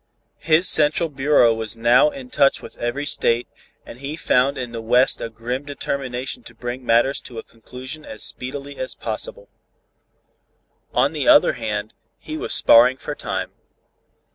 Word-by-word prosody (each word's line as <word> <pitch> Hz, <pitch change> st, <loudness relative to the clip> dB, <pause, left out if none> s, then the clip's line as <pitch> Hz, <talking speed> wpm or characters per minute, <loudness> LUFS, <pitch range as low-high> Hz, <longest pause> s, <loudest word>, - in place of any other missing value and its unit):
His 165 Hz, +3 st, +3 dB
central 155 Hz, +2 st, +4 dB
bureau 135 Hz, -4 st, +3 dB
was 110 Hz, 0 st, -5 dB
now 120 Hz, -, +4 dB
in 270 Hz, -3 st, -11 dB
touch 140 Hz, -, +2 dB
with -, -, -12 dB
every 120 Hz, +5 st, -3 dB
state, 120 Hz, -4 st, +1 dB, 0.4 s
and 120 Hz, -, -12 dB
he 140 Hz, +3 st, -5 dB
found 140 Hz, -4 st, +1 dB
in 125 Hz, -2 st, -5 dB
the 115 Hz, -1 st, -6 dB
West 125 Hz, +3 st, +2 dB
a -, -, -4 dB
grim 120 Hz, +4 st, -5 dB
determination 135 Hz, -3 st, -4 dB
to 120 Hz, -, -14 dB
bring 120 Hz, +2 st, -6 dB
matters 120 Hz, +4 st, +2 dB
to 120 Hz, -, -11 dB
a 110 Hz, -, -6 dB
conclusion 130 Hz, +6 st, -10 dB
as 110 Hz, -, -6 dB
speedily 140 Hz, +2 st, -4 dB
as 130 Hz, -, -5 dB
possible. -, -, -5 dB, 1.4 s
On -, -, +1 dB
the -, -, -3 dB
other 300 Hz, -, +6 dB
hand, 110 Hz, -3 st, -4 dB, 0.2 s
he 155 Hz, -, -8 dB
was -, -, -5 dB
sparring 125 Hz, +3 st, +6 dB
for -, -, -6 dB
time. -, -, -5 dB
130 Hz, 160 wpm, -21 LUFS, 120-145 Hz, 1.4 s, other